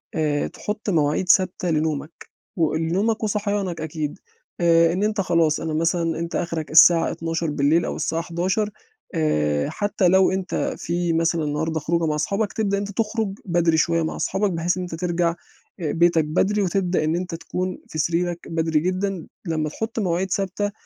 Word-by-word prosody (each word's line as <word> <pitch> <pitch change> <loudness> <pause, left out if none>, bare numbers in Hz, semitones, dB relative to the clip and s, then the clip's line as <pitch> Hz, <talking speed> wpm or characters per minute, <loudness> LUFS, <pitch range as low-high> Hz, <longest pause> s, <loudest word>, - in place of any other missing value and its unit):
آآ، 150 -2 0
تحُط 210 0 -5
مواعيد 160 +1 +1
ثابتة 185 -1 +3
لنومك 155 -1 -2 0.3
و 160 -3 +2
آآ، - - +1
لنومك 195 +8 0
وصحيانك 205 -5 -1
أكيد 155 -1 -4 0.4
آآ، 165 -1 +5
إن 190 +3 -1
أنت 210 -1 +1
خلاص 165 -4 +2
أنا 160 -1 -3
مثلًا 165 0 0
أنت 170 0 -4
أخرك 165 -3 -3
الساعة 165 +1 +7
00:00 165 -1 0
أو - - -3
الساعة 160 +1 -1
23:00 185 +5 -1 0.5
آآ، 75 - +1
حتى 205 -2 0
لو 190 +2 +5
أنت 190 -1 -2
في 175 0 -1
مثلًا 165 0 +1
النهارده 160 +2 -1
خروجة 165 +2 0
مع 150 - 0
أصحابك 200 +7 -1
تبدأ 200 -2 0
إن 200 - -1
أنت - - -7
تخرج 220 -2 -1
بدري 170 -3 +2
شوية 165 +1 +2
مع 160 - -3
أصحابك 195 +1 0
بحيث 170 +1 0
إن 185 - -2
أنت 175 -2 -5
ترجع 170 0 0 0.4
آآ، 160 -4 -1
بيتك 170 -2 +3
بدري 195 +7 +1
وتبدأ 185 -2 0
إن 155 +2 +1
أنت 180 -1 -3
تكون 185 +2 -4
في - - -7
سريرك 170 +2 0
بدري 160 -1 +1
جدًا، 185 +1 -2 0.2
لمّا 155 -3 -1
تحُط 225 +8 -4
مواعيد 185 -1 -1
ثابتة 200 +2 -1
170 Hz, 175 wpm, -23 LUFS, 160-190 Hz, 0.5 s, الساعة